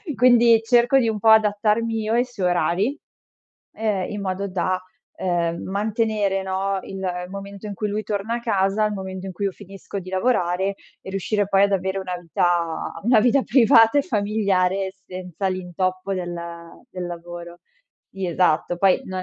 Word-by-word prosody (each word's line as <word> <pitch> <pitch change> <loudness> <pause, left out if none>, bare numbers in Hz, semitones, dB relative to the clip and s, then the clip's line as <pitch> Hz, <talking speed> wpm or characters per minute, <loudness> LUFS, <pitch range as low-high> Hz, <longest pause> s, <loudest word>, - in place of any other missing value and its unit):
quindi 235 -2 +5
cerco 240 +3 +4
di 240 -4 +3
un 220 -1 -1
po' 220 - +3
adattarmi 220 +1 +3
io 215 +1 -1
ai 240 +2 +3
suoi 205 -8 -2
orari, 190 +9 0 0.8
ehm 210 -4 -1
in 205 -1 -4
modo 195 +1 -2
da 185 0 -1 0.4
ehm 170 -2 -1
mantenere, 210 -1 0
no, 190 +1 -1
il 195 - -7 0.3
momento 200 +1 -8
in 205 - -5
cui 210 +2 -2
lui 210 +1 -2
torna 210 +2 -2
a - - -3
casa, 200 -1 +1
il 210 - -1
momento 190 -1 -6
in - - -5
cui 200 - -3
io 195 - 0
finisco 195 +1 -8
di 185 -1 -10
lavorare 190 -2 0 0.3
e - - -9
riuscire 195 +1 -1
poi 195 0 +4
ad 200 - +2
avere 190 0 -1
una 180 -1 -4
vita 170 -1 -1
una 235 0 +5
vita 250 +4 +4
privata 225 0 +5
e - - +3
familiare 195 -4 0
senza 185 +1 -5
l'intoppo 185 +1 -2
del 175 -2 -4 0.6
del 180 -4 -5
lavoro. 175 0 -8 0.5
Sì, 195 -1 -4
esatto. 175 0 +1
Poi 190 0 +3
non 185 0 -4
195 Hz, 170 wpm, -22 LUFS, 185-215 Hz, 0.8 s, quindi